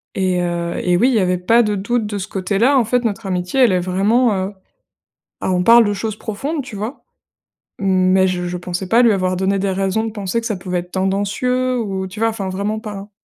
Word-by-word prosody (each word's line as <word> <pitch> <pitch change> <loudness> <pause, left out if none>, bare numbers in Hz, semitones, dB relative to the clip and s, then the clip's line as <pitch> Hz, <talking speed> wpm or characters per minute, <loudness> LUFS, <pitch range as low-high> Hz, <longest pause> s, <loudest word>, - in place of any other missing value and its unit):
et 185 -2 +1
heu 170 -1 -2
et 180 -1 +2
oui, 250 +6 +4
il - - +1
y 220 - +3
avait 180 -1 +1
pas 230 +7 +3
de 210 -1 0
doute 220 +3 -1
de 205 -1 -4
ce 195 +1 -5
côté-là. 205 +9 +1
En 240 - +3
fait, 245 +2 +1
notre 220 -1 -2
amitié, 180 +7 -1
elle 235 -6 +5
est 180 - +2
vraiment, 205 +6 +2
heu 205 - -9 0.9
bah, - - -1
on 180 -1 +1
parle 230 +3 +7
de 205 - 0
choses 215 +1 -3
profondes, 275 +10 -4
tu 240 -5 -9
vois? 215 +7 -6 0.8
Mais 190 -1 +3
je 180 -1 -2
je 180 - -4
pensais 180 +1 -5
pas 235 +2 +5
lui 230 -3 +5
avoir 185 -1 0
donné 195 +1 0
des 195 0 0
raisons 195 +3 0
de 225 - -3
penser 205 +2 -2
que 230 - -7
ça 215 - -1
pouvait 180 -1 -3
être 180 +1 -13
tendancieux 210 +7 0
ou, 190 -3 -3
tu 200 +3 -11
vois? 225 - +3
Enfin, 200 -4 -4
vraiment 205 +3 -2
pas, 215 -2 -7
hein. 200 +2 -9
200 Hz, 240 wpm, -19 LUFS, 185-225 Hz, 0.9 s, parle